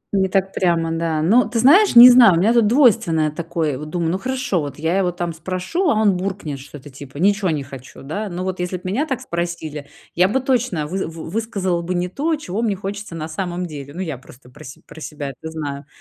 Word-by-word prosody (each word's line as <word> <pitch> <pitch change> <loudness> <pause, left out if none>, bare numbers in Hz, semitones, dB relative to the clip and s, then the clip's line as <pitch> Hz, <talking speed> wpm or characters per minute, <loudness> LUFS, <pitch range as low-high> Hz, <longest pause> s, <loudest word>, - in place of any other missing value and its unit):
Не 190 -1 +2
так 195 0 0
прямо, 165 -2 0
да. 165 -1 -1
Ну, 225 +10 +3
ты 235 - -3
знаешь, 305 - +5
не 240 +1 +12
знаю, 245 -6 +7
у - - +1
меня 205 +7 +3
тут 235 -3 +4
двойственное 190 - +3
такое. 160 -3 -3
Вот 150 +1 -7
думаю: 165 0 -1
ну, 185 - -2
хорошо, 255 -5 -2
вот 145 -1 -6
я 160 +3 -1
его 185 -2 +1
там 175 -1 -4
спрошу, 185 - -2
а - - +2
он 205 -3 +3
буркнет 180 -7 -4
что-то 145 +1 -12
типа 140 +1 -11
"ничего 200 +3 +2
не 150 -3 -2
хочу", 135 -1 -12
да. 200 +10 -4
Но 180 0 -5
вот 185 -1 -4
если 180 +1 -3
б - - -15
меня 220 +12 -1
так 265 -5 -3
спросили, 170 -4 -5 0.3
я 180 +2 +3
бы 220 +7 0
точно 245 - -1
вы 190 +5 -3
вы 165 0 -9
высказала 195 -5 -2
бы 180 +2 -3
не 180 +1 -1
то, 310 - -1
чего 220 -8 -5
мне 215 -4 0
хочется 200 -1 -6
на 155 -1 -5
самом 175 +2 -4
деле. 145 -4 -8
Ну, 185 - -4
я 155 -8 -5
просто 125 -1 -17
про - - -14
се 130 - -11
про 160 - -13
себя 145 -2 -6
это 160 +5 -9
знаю. 145 -3 -6
180 Hz, 235 wpm, -20 LUFS, 155-205 Hz, 0.3 s, не